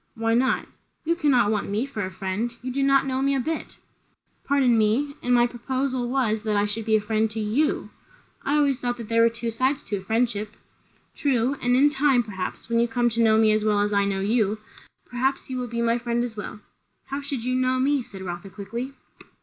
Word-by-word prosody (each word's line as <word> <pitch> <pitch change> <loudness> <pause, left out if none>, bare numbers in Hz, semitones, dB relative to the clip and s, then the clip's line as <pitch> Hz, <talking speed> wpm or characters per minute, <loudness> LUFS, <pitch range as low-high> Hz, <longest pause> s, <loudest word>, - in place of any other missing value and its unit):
"Why 225 0 0
not?" 250 +3 +2 0.4
"You 335 +2 +2
cannot 265 -10 +3
want 210 -2 -1
me 210 +5 0
for 220 -7 -4
a 185 - -3
friend. 190 +6 -3
You 255 - -3
do 275 +2 -1
not 275 0 +4
know 260 -1 -1
me 275 0 +2
a - - +1
bit." 315 +5 -4 0.7
"Pardon 270 -4 +3
me. 225 +7 +2
And 245 - -1
my 240 -1 +5
proposal 255 +1 -2
was, 235 -5 +1
that 215 -2 0
I 205 - +2
should 210 +1 -3
be 220 -1 +3
a - - +4
friend 220 +1 0
to 220 +1 -5
you." 220 +9 0 0.5
"I 280 +2 +1
always 280 -3 +2
thought 245 -1 -2
there 230 0 +1
were 230 - +6
two 230 0 -4
sides 260 +5 0
to 205 - -3
a - - -7
friendship." 215 0 -1 0.6
"True; 265 -1 +1
and 245 0 +2
in 285 +3 +5
time, 270 -3 +3
perhaps, 190 -4 -6
when 230 0 +1
you 235 - +3
come 240 0 +1
to 230 0 0
know 220 -1 +5
me 220 -1 +5
as 215 0 +1
well 210 -1 +2
as 205 0 0
I 200 0 +3
know 195 -1 -1
you, 215 0 +1 0.5
perhaps 265 +2 -2
you 255 - -2
will 250 - -3
be 235 0 -2
my 235 +1 +2
friend 235 0 -1
as 240 -2 -5
well." 210 0 -7 0.5
"How 280 +1 -2
should 280 -4 -4
you 255 +1 -1
know 255 0 +2
me?" 275 +2 +2
said 195 -5 -10
Rotha 175 +1 -6
quickly. 230 +7 -6
235 Hz, 225 wpm, -24 LUFS, 215-260 Hz, 0.7 s, were